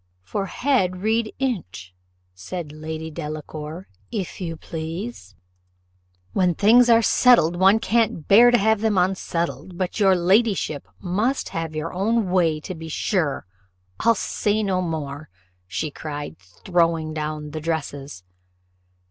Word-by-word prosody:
"For 195 - -3
head 190 -8 0
read 220 0 +1
inch," 180 - -4 0.4
said 150 - -6
Lady 160 +1 -6
Delacour, 155 +2 -6 0.2
"if 195 -3 -4
you 165 -2 -4
please." 160 - -6 1.0
"When 180 -3 +2
things 235 +6 +5
are 230 0 +6
settled, 220 -9 +5
one 190 +4 +5
can't 220 -8 0
bear 235 +5 +8
to 240 - +5
have 220 0 +2
them 220 -3 +1
unsettled 170 -3 -1
but 185 +3 -2
your 195 -2 +5
ladyship 190 - +1
must 210 +9 -1
have 165 -1 -4
your 155 +2 -4
own 205 +1 0
way, 165 -4 +2
to 185 - -6
be 160 -1 -8
sure 160 -2 -1 0.5
I'll 230 0 +4
say 210 +1 -1
no 190 -2 0
more," 155 -4 -4 0.6
cried 145 -2 -6
she, 90 -2 -26
throwing 165 -3 +1
down 150 -1 -4
the 155 +1 -5
dresses. 145 - -4
175 Hz, 130 wpm, -23 LUFS, 155-205 Hz, 1.0 s, bear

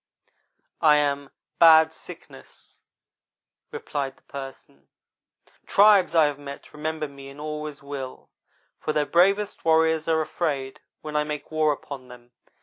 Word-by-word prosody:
"'I 150 -2 +6
am 140 -1 0 0.3
Bad 160 -1 +7
Sickness,' - - -13 0.9
replied 135 -2 -5
the - - -28
Person. 135 - -10 0.8
'Tribes 200 -4 +5
I 160 -2 +6
have 145 -1 -2
met 140 -1 -10
remember 155 0 -3
me 140 -1 -12
and 140 +1 -13
always 150 -1 -6
will, 140 -2 -8 0.5
for 155 - -2
their 150 -1 +1
bravest 195 +6 +2
warriors 160 -1 +2
are 160 -1 +2
afraid 140 -5 -3 0.2
when 150 -1 -7
I 150 - +2
make 150 0 -6
war 155 -1 +2
upon 140 -2 -7
them. 120 -1 -15
150 Hz, 135 wpm, -25 LUFS, 140-160 Hz, 0.9 s, Bad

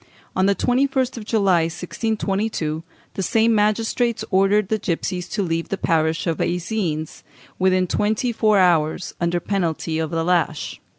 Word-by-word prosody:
On 190 +1 +3
the 200 - +3
21st 260 +2 +1
of 220 - -7
July, 195 -7 +2
1622, 195 -2 -2 0.3
the - - -3
same 225 +4 +2
magistrates 225 +2 +1
ordered 195 +1 +3
the 220 - 0
gipsies 180 0 -3
to 205 - -1
leave 165 -2 -2
the 195 - -2
parish 160 -2 +1
of 165 -3 0
Eysines 175 -4 -2 0.4
within 185 0 +3
twenty 215 +6 0
four 215 -2 +3
hours, 170 -2 +2
under 170 +1 +1
penalty 165 -4 -2
of 160 -1 -1
the 165 -1 -1
lash. 170 -3 -1
190 Hz, 145 wpm, -22 LUFS, 165-215 Hz, 0.4 s, On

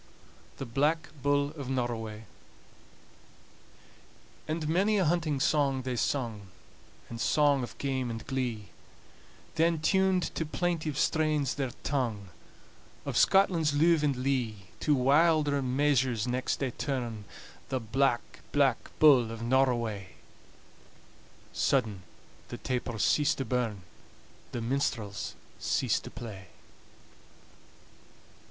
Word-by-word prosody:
THE 135 - -5
BLACK 145 +7 0
BULL 145 +1 +2
OF 140 -4 -7
NORROWAY 115 -4 -3 2.2
And 155 0 -2
many 195 +7 +2
a 190 - +2
hunting 155 -3 +1
song 135 -2 +1
they 130 -1 -2
sung, 115 -5 -2 0.6
And 115 0 -7
song 145 -2 +3
of 120 - -7
game 130 -3 -2
and 115 -1 -6
glee; 125 -6 -3 0.8
Then 165 +1 +2
tuned 190 +2 +2
to - - -1
plaintive 160 -2 -2
strains 155 -3 +1
their 135 -2 -2
tongue, 115 -9 -2 0.8
"Of - - -3
Scotland's 175 -6 +4
luve 165 +1 +4
and 145 -2 +1
lee." 125 -7 -2
To 150 - +2
wilder 145 +2 +3
measures 130 -3 +1
next 125 +1 0
they 135 -2 0
turn 120 -6 -4 0.4
"The 130 - -1
Black, 120 +2 0
Black 135 -4 +2
Bull 135 -7 +6
of 115 0 -6
Norroway!" 115 -7 0 1.4
Sudden 110 -8 +1 0.5
the - - -7
tapers 120 -4 -2
cease 150 +1 +3
to 135 - -3
burn, 115 -5 -2 0.7
The 120 - -4
minstrels 115 -5 -2 0.2
cease - - +1
to - - -9
play. 100 -6 -9
135 Hz, 110 wpm, -29 LUFS, 115-150 Hz, 2.2 s, Bull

